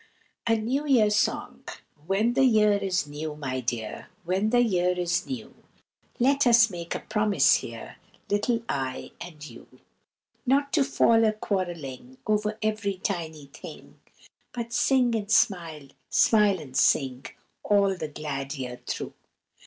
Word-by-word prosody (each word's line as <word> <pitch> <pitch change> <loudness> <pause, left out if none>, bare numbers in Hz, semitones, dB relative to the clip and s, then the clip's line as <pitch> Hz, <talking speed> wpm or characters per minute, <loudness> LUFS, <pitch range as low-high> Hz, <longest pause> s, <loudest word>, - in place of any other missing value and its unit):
A 225 - +4
NEW 260 +7 -2
YEAR 225 -7 +4
SONG. 210 - -1 0.4
When 210 +5 +1
the 270 - +3
year 215 -4 +4
is 195 -5 0
new, 150 +1 -6
my 130 -3 -4
dear, 115 -3 -4 0.2
When 190 +5 0
the 245 +1 +4
year 180 -5 +1
is 175 +1 -1
new, 255 -5 -6 0.7
Let 275 +2 +3
us 230 -2 +6
make 170 -1 -5
a - - -4
promise 210 -2 +3
here, - - -9 0.3
Little 225 +3 0
I 130 -2 -3
and 155 -4 -10
you, 120 -3 -13 0.8
Not 280 +2 +1
to 295 - +4
fall 230 -4 +3
a 215 -1 +3
quarrelling 165 -12 -4
Over 210 0 0
every 215 -2 -1
tiny 160 -6 -4
thing, 140 - -12 0.5
But 235 -1 -5
sing 245 0 +2
and 210 -2 -2
smile, 165 -10 +1 0.2
smile 210 -4 +4
and 135 -4 -11
sing, 135 -1 +2 0.3
All 200 -2 +2
the 160 - -5
glad 145 -1 -5
year 125 -3 -6
through. - - -4
200 Hz, 145 wpm, -26 LUFS, 150-225 Hz, 0.8 s, us